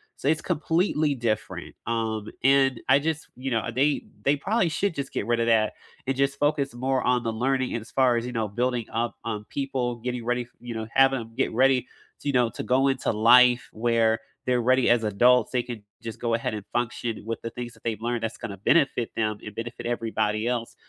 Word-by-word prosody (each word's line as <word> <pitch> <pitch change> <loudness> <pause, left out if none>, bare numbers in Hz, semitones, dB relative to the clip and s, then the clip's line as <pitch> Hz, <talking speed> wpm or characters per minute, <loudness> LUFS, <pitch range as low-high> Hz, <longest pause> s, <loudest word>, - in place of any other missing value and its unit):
so - - -5
it's 155 +1 +2
completely 160 -2 +1
different, 115 -4 -3
um, 110 -2 -2 0.2
and 135 -2 +4
I 135 - +7
just, 160 +1 -2
you 130 +1 -4
know, 115 -1 0
they 140 +4 +1 0.2
they 140 - +3
probably 195 +5 +1
should 170 +3 -1
just 140 -1 -5
get 100 - -2
rid 120 0 +1
of 115 - +2
that 110 -2 +3 0.3
and 135 - +1
just 140 0 +1
focus 145 -3 +1
more 130 +1 0
on 125 0 +2
the 115 - -1
learning, 130 +2 0
and 115 - -2
as 110 - -14
far 130 -3 +3
as, 115 - -2
you 125 - -4
know, 115 -3 -1
building 120 +2 -1
up, 115 +1 -1
um, 105 -2 -3
people, 130 -3 -2
getting 125 0 -4
ready 125 +1 0
f 120 - -17
you 120 -1 -7
know, 110 -1 -4
have 135 0 +5
'em 115 -3 -5
get - - 0
ready 130 +1 +4 0.4
to, - - -7
you 140 - +1
know, 125 -2 +3
to - - -6
go 130 +2 +2
into 135 -1 0
life, 125 +3 +5
where 115 0 +2 0.3
they're 125 -1 +2
ready 130 +2 +3
as 120 -1 +4
adults, 115 +3 +4
they 125 - +1
can 120 -4 -7 0.2
just 115 -1 -7
go 115 -1 -1
ahead 115 -1 -1
and 105 -2 -7
function 120 -1 -2
with 115 0 -3
the 115 - -3
things 120 -1 -6
that - - -21
they've 110 -2 -3
learned 120 0 -2
that's 115 0 -3
gonna 100 -2 -6
benefit 125 - +2
them 110 -2 0
and 105 - -7
benefit 115 +2 -6
everybody 110 -2 -1
else, 120 -2 -2
120 Hz, 225 wpm, -26 LUFS, 115-135 Hz, 0.4 s, I